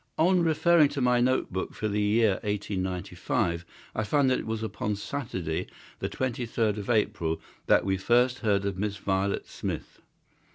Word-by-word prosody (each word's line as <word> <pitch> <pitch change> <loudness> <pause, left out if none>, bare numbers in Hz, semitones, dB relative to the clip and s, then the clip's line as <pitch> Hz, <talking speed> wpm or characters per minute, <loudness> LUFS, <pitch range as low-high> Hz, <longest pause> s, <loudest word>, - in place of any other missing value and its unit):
On 180 +2 +4
referring 165 -1 +4
to - - +2
my 125 -1 +3
note 130 -5 +1
book 95 - -3
for 110 - -2
the 105 0 0
year 105 -1 +3
1895 95 -4 -2 0.3
I 110 - -1
find 130 +5 +2
that 130 - +2
it - - -6
was 110 0 -2
upon 105 0 -2
Saturday, 100 - -3 0.3
the - - -2
23rd 115 -4 -1
of 105 +1 -6
April, 85 -8 +1 0.3
that - - +4
we 95 -1 +1
first 125 +6 +3
heard 100 -3 +1
of 100 -2 -2
Miss 105 0 -1
Violet 95 0 -1
Smith. - - -6
105 Hz, 165 wpm, -28 LUFS, 95-125 Hz, 0.3 s, On